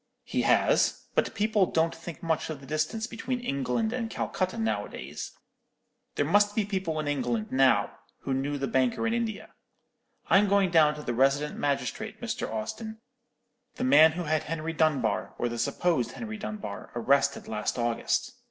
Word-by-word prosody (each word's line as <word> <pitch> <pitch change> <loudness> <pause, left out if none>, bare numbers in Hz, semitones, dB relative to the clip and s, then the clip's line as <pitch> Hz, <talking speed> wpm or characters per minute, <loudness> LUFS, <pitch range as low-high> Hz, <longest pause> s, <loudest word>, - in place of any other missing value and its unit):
"'He - - -1
has; - - +3
but - - 0
people 210 -2 +2
don't 165 +1 +1
think 165 -1 -9
much 165 -1 0
of 155 -3 -5
the 135 - -13
distance 155 - -1
between 245 +2 -4
England 140 - -1
and 240 -3 -2
Calcutta 185 -1 -2
nowadays. 225 0 -3 0.8
There - - +1
must 205 0 +3
be 215 - +1
people 190 -6 -2
in 155 - -3
England 120 -6 -1
now 130 0 +3 0.2
who 135 - -2
knew 140 +2 -1
the 135 - -1
banker 130 - +1
in 225 - +1
India. 230 -3 -3 0.7
I'm 205 +1 +5
going 200 -2 +3
down 155 -3 +5
to 150 - -8
the 120 - -2
resident 135 +4 +2
magistrate, 140 -1 -2
Mr. - - -3
Austin; 220 - -5 0.8
the - - -3
man 160 - +7
who 175 +2 -3
had 155 -1 +1
Henry 165 +1 -3
Dunbar, 150 -8 +1
or 120 - 0
the 120 0 -5
supposed 130 -9 0
Henry 220 -2 -6
Dunbar, 210 - -6
arrested 140 +3 +2
last 105 +2 -2
August. 120 -1 0
155 Hz, 165 wpm, -28 LUFS, 135-205 Hz, 0.8 s, man